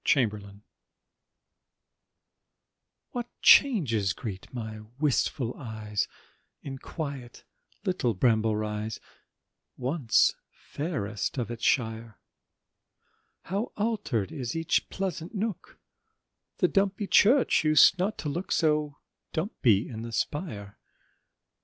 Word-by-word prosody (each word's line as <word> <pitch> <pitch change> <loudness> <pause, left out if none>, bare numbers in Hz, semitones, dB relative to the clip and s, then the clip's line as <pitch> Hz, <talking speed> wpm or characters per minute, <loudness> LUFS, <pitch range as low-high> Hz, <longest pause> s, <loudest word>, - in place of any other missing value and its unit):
BRAMBLE 110 -7 +2
RISE 100 0 -13 2.6
What 240 -1 -4 0.2
changes 120 - +5
greet 100 -5 -7
my 110 -3 -6 0.2
wistful 135 -4 +1
eyes 110 -4 -3 0.6
In 135 -1 -6
quiet 140 -7 -6 0.4
little 155 - 0
Bramble 110 +1 +2
Rise, 105 0 -3 0.8
Once 130 -1 +2 0.2
fairest 110 - -4
of 120 -2 -2
its 120 0 -7
shire; 115 -3 0 1.3
How 200 +6 -3
alter'd 205 - -1
is 130 -5 -4
each 165 -1 0
pleasant 185 0 -4
nook, 210 -2 -4 0.8
The - - +3
dumpy 200 +1 +1
church 235 - +4
used 155 +4 +6
not 195 +2 0
to 145 +1 -3
look 175 +6 -4
So 150 -3 +1 0.4
dumpy 130 - +1
in 110 -2 -7
the 115 0 -6
spire. 110 - -4
130 Hz, 100 wpm, -28 LUFS, 110-175 Hz, 2.6 s, used